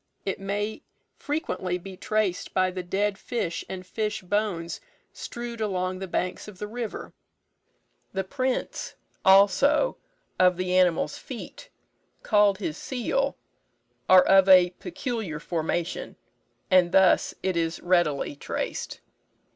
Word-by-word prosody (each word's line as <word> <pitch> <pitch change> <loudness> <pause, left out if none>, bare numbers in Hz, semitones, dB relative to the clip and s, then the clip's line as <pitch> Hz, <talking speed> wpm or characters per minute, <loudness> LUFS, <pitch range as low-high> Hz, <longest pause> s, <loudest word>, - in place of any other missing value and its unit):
It 195 - -2
may 205 +2 -3 0.3
frequently 185 - -2
be 190 +1 -10
traced 210 -2 -1
by 185 -1 +3
the 185 0 -4
dead 195 +3 -1
fish 205 -9 -3
and 185 -1 -6
fish 215 +1 -3
bones 180 -4 -2 0.3
strewed 235 -1 -6
along 185 -3 -1
the 190 - -5
banks 180 +2 -2
of 210 -3 -11
the 210 - -4
river. 230 +1 -6 1.0
The 190 0 -2
prints, 255 +6 -3 0.3
also, 240 - +5 0.4
of 180 -1 +5
the 185 0 -1
animal's 180 -3 +2
feet, - - -9 0.5
called 205 -2 +4
his 170 -6 -4
seal, 275 +2 -1 0.7
are 185 0 +9
of 195 0 +5
a 180 -2 +7
peculiar 230 - -4
formation, 170 +1 -3 0.6
and 180 -2 +5
thus 190 -1 +4
it 190 -1 0
is 165 0 -1
readily 175 -6 +1
traced. - - -4
190 Hz, 125 wpm, -26 LUFS, 180-215 Hz, 1.0 s, are